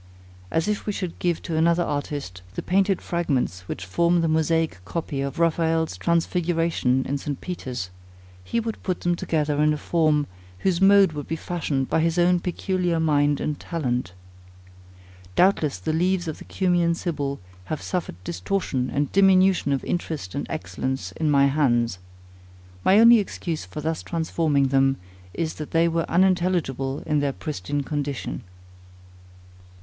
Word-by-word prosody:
As 160 - 0
if 210 0 -2
we 210 - 0
should 185 -4 -5
give 175 -2 0
to 165 - -3
another 170 +2 +3
artist, 145 - -4
the - - -3
painted 195 +1 +1
fragments 130 - -1
which 95 - -5
form 170 - +2
the 165 - +1
mosaic 160 - +1
copy 145 - -3
of 140 -1 -4
Raphael's 165 - +1
Transfiguration 165 - +1
in 140 +1 -2
St. 140 -1 -4
Peter's; 125 - -5 0.5
he 230 - -1
would 225 -1 -4
put 185 -2 -2
them 175 0 +1
together 150 -3 0
in 150 0 +4
a - - -2
form, 155 -2 +2 0.4
whose 185 -2 +1
mode 195 -2 +6
would 150 -2 -6
be 165 - -2
fashioned 155 -6 -2
by - - +1
his 165 +1 +1
own 175 0 +4
peculiar 180 -1 -1
mind 145 -2 +2
and 150 -1 -2
talent. 125 - -2 1.2
Doubtless 170 - +3
the 90 +12 -2
leaves 180 +2 +1
of 160 - -5
the - - -11
Cumæan 175 -3 +1
Sibyl 145 -6 -3 0.3
have 155 - -3
suffered 180 - -3
distortion 125 - -2
and 145 -1 -1
diminution 190 -5 +4
of 135 - 0
interest 155 - -3
and - - -3
excellence 95 +4 -3
in 155 +9 -1
my 140 -1 +5
hands. 120 -8 +1 0.8
My 195 - +5
only 230 0 +8
excuse 170 -5 -4
for 150 - -7
thus 160 +1 -2
transforming 160 -4 0
them, 135 0 +3 0.4
is 160 -1 -2
that 150 - -5
they 165 +1 +3
were 165 0 -1
unintelligible 175 -7 +1
in 150 -1 +1
their 145 -1 0
pristine 145 0 -3
condition. 145 -2 -3
160 Hz, 155 wpm, -24 LUFS, 140-175 Hz, 1.2 s, only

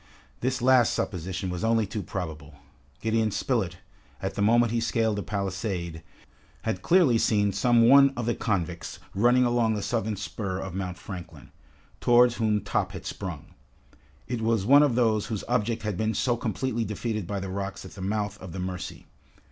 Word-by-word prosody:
This 130 0 -1
last 130 -2 +5
supposition 90 0 -3
was 90 -1 -4
only 115 -1 +2
too 105 +2 -4
probable. 80 -6 -6 0.5
Gideon 110 0 +1
Spilett, 100 -6 -1 0.4
at - - -3
the - - -3
moment 115 +2 +4
he 120 - +1
scaled 115 -1 +1
the 105 - -2
palisade, 95 -3 -3 0.6
had 95 - -2
clearly 160 - +4
seen 105 -3 +2
some 115 +3 +4
one 140 +2 +8
of 120 - -2
the 120 - +1
convicts 90 -7 -2 0.2
running 120 +5 +4
along 120 -2 +2
the 105 - -3
southern 110 -3 -1
spur 100 -1 -4
of 95 -2 -5
Mount 90 -1 -4
Franklin, 90 -2 -9 0.5
towards 120 0 +5
whom 110 -2 +1
Top 100 - -1
had - - -8
sprung. - - -6 0.7
It 120 -2 -3
was 110 -3 +1
one 140 +5 +7
of 145 -5 +3
those 110 -4 +2
whose 110 -4 -3
object 115 -2 0
had 105 -4 -2
been 110 +1 0
so 120 +3 +1
completely 120 +1 -2
defeated 110 -2 -3
by 100 +1 -2
the 95 0 -5
rocks 95 0 -5
at - - -10
the 100 - -10
mouth 105 +1 -2
of 95 -3 -8
the 95 - -5
Mercy. 90 0 -5
110 Hz, 180 wpm, -27 LUFS, 95-120 Hz, 0.7 s, one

